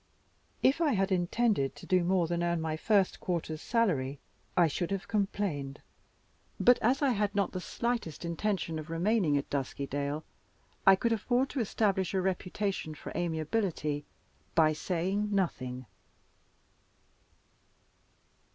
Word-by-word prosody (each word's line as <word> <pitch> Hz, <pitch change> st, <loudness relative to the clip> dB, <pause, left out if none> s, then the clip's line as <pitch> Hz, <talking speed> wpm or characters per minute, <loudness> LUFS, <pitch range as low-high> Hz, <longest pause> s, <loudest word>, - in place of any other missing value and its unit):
If 280 Hz, +6 st, +4 dB
I 300 Hz, -5 st, +3 dB
had 195 Hz, 0 st, +1 dB
intended 185 Hz, -, +1 dB
to -, -, -11 dB
do 185 Hz, -1 st, +3 dB
more 180 Hz, 0 st, +2 dB
than 170 Hz, +1 st, -1 dB
earn 170 Hz, -1 st, +1 dB
my 160 Hz, -1 st, -2 dB
first 195 Hz, +3 st, +2 dB
quarter's 160 Hz, -3 st, -3 dB
salary, 145 Hz, -, +1 dB, 0.4 s
I 175 Hz, -, +7 dB
should 165 Hz, +2 st, -1 dB
have 195 Hz, -1 st, -3 dB
complained. 195 Hz, -10 st, -1 dB, 0.8 s
But 245 Hz, 0 st, +6 dB
as 260 Hz, +6 st, +2 dB
I 275 Hz, -, +4 dB
had 205 Hz, -2 st, 0 dB
not 200 Hz, -2 st, +1 dB
the 185 Hz, -, -4 dB
slightest 235 Hz, -, -3 dB
intention 170 Hz, -2 st, -1 dB
of 155 Hz, +1 st, -8 dB
remaining 170 Hz, -2 st, +2 dB
at 140 Hz, -, -2 dB
Duskydale, 140 Hz, +2 st, -2 dB, 0.6 s
I 195 Hz, -, +10 dB
could 230 Hz, +5 st, 0 dB
afford 245 Hz, +4 st, +1 dB
to 275 Hz, -, -2 dB
establish 195 Hz, -4 st, +1 dB
a 190 Hz, -, +2 dB
reputation 190 Hz, -3 st, -2 dB
for -, -, -8 dB
amiability 160 Hz, -2 st, -1 dB, 0.5 s
by 155 Hz, -1 st, +5 dB
saying 190 Hz, +6 st, -1 dB
nothing. 130 Hz, -9 st, -1 dB
180 Hz, 135 wpm, -31 LUFS, 155-210 Hz, 0.8 s, I